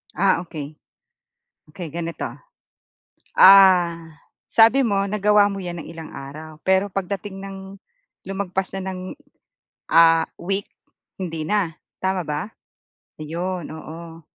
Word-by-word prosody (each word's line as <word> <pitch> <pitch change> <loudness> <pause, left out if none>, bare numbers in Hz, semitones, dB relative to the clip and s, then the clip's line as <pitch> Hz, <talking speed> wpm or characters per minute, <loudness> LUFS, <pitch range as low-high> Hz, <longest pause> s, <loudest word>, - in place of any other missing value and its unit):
Ah, 195 -3 +3
okey. 150 -2 -8 0.9
Okey 170 -5 -8
ganito, 170 -1 -4 1.1
ah, 180 -4 +7 0.4
sabi 230 +4 +6
mo 200 -3 +1
nagawa 210 0 +4
mo 195 -2 -5
'yan 175 -1 -5
ng - - -9
ilang 165 -1 -9
araw 155 +3 -9
pero 190 +1 +3
pagdating 195 +1 -4
ng 195 0 -7 0.7
lumagpas 190 -1 -3
na 190 0 -4
ng, 185 - -6 0.9
ah, 165 -1 +6 0.2
week 195 +2 -3 0.5
hindi 165 -4 -4
na. 170 -1 0 0.2
Tama 190 -1 -1
ba? 150 +3 -3 0.7
Ayun, 170 +2 -4
oo. 165 +1 -9
185 Hz, 115 wpm, -22 LUFS, 165-195 Hz, 1.1 s, ah